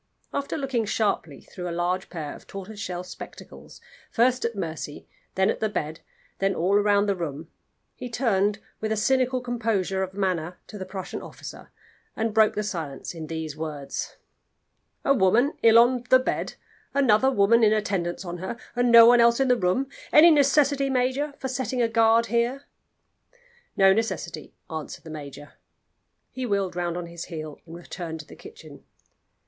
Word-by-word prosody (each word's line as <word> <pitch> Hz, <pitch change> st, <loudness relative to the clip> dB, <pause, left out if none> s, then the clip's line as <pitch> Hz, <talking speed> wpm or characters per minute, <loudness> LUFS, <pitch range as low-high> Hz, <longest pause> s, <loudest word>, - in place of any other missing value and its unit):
After 280 Hz, +2 st, -2 dB
looking 265 Hz, -6 st, -1 dB
sharply 200 Hz, -, -1 dB
through 180 Hz, -1 st, -7 dB
a 170 Hz, 0 st, -4 dB
large 180 Hz, +2 st, -1 dB
pair 155 Hz, -5 st, -5 dB
of -, -, -15 dB
tortoise 195 Hz, +2 st, -8 dB
shell 180 Hz, -2 st, -4 dB
spectacles, 180 Hz, -, -11 dB, 0.3 s
first 250 Hz, +2 st, +2 dB
at 235 Hz, -1 st, -2 dB
Mercy, 160 Hz, -5 st, -5 dB, 0.3 s
then 190 Hz, 0 st, +3 dB
at -, -, -5 dB
the 220 Hz, -, 0 dB
bed, 160 Hz, -5 st, -4 dB, 0.4 s
then 195 Hz, -1 st, +1 dB
all 185 Hz, +4 st, +1 dB
round 205 Hz, 0 st, +3 dB
the 200 Hz, -, +1 dB
room, 160 Hz, -2 st, -6 dB, 0.4 s
he 250 Hz, -, -7 dB
turned 210 Hz, -4 st, +1 dB, 0.2 s
with 220 Hz, 0 st, -3 dB
a 220 Hz, -, 0 dB
cynical 255 Hz, +3 st, +1 dB
composure 225 Hz, -6 st, -1 dB
of 190 Hz, 0 st, -4 dB
manner 180 Hz, -3 st, -1 dB
to 210 Hz, -, -10 dB
the 190 Hz, -, -6 dB
Prussian 190 Hz, -1 st, -6 dB
officer, -, -, -10 dB, 0.5 s
and 225 Hz, -1 st, -1 dB
broke 220 Hz, 0 st, +4 dB
the 210 Hz, -, -1 dB
silence 160 Hz, -10 st, -5 dB
in 160 Hz, -2 st, -7 dB
these 160 Hz, -2 st, -5 dB
words: 150 Hz, -3 st, -5 dB, 0.9 s
"A 275 Hz, -, +5 dB
woman 240 Hz, +5 st, +3 dB
ill 230 Hz, 0 st, +7 dB
on 245 Hz, +1 st, +4 dB
the 260 Hz, -, +8 dB
bed; 255 Hz, -, -3 dB, 0.4 s
another 265 Hz, -2 st, +4 dB
woman 230 Hz, -1 st, +4 dB
in 215 Hz, -, +6 dB
attendance 195 Hz, -4 st, -1 dB
on 175 Hz, 0 st, -5 dB
her, 190 Hz, +6 st, -5 dB, 0.2 s
and 245 Hz, 0 st, +2 dB
no 230 Hz, -1 st, +10 dB
one 240 Hz, 0 st, +7 dB
else 235 Hz, +1 st, +4 dB
in 270 Hz, -1 st, +2 dB
the 250 Hz, -, +5 dB
room. 210 Hz, +5 st, +1 dB, 0.3 s
Any 335 Hz, +3 st, +8 dB
necessity, 280 Hz, -1 st, +3 dB
major, 265 Hz, +3 st, 0 dB
for 265 Hz, -, -4 dB
setting 260 Hz, 0 st, -3 dB
a 235 Hz, -, +3 dB
guard 225 Hz, 0 st, +4 dB
here?" 235 Hz, +4 st, 0 dB, 1.1 s
"No 195 Hz, -1 st, +6 dB
necessity," 225 Hz, +2 st, -3 dB
answered 160 Hz, -3 st, -7 dB
the 160 Hz, -, -10 dB
major. 145 Hz, -1 st, -9 dB, 0.8 s
He 255 Hz, -1 st, -4 dB
wheeled 195 Hz, -4 st, -1 dB
round 175 Hz, -1 st, -2 dB
on 175 Hz, -, -4 dB
his 170 Hz, 0 st, -8 dB
heel 155 Hz, -3 st, -7 dB
and 165 Hz, -, -9 dB
returned 170 Hz, -2 st, -7 dB
to -, -, -17 dB
the -, -, -13 dB
kitchen. 450 Hz, +3 st, -13 dB
205 Hz, 175 wpm, -25 LUFS, 175-245 Hz, 1.1 s, no